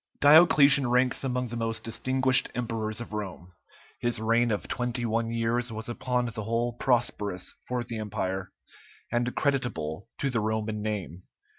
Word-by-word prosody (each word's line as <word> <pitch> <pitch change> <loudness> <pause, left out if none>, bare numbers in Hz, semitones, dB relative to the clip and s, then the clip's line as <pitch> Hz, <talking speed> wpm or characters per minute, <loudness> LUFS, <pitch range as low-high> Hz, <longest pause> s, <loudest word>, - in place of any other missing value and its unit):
Diocletian 145 -3 +7
ranks 125 +1 +2
among 125 -2 -1
the 120 - -5
most 115 -1 -2
distinguished 130 +3 +2
emperors 115 -2 -3
of 120 - -8
Rome; 95 -4 -6 0.5
his 120 -2 0
reign 115 +2 +2
of 105 -2 -2
twenty 120 -1 -2
one 115 0 0
years 115 +1 -1
was 110 +1 -5
upon 125 +1 -1
the 110 -2 -5
whole 115 +3 -1
prosperous 115 -7 0
for 125 -1 -2
the 115 -1 -6
empire, 95 -3 -3 0.6
and 120 +1 0
creditable 120 - -1
to 140 - -1
the 115 - 0
Roman 110 0 -2
name. 100 -5 -4
115 Hz, 150 wpm, -27 LUFS, 110-125 Hz, 0.6 s, Diocletian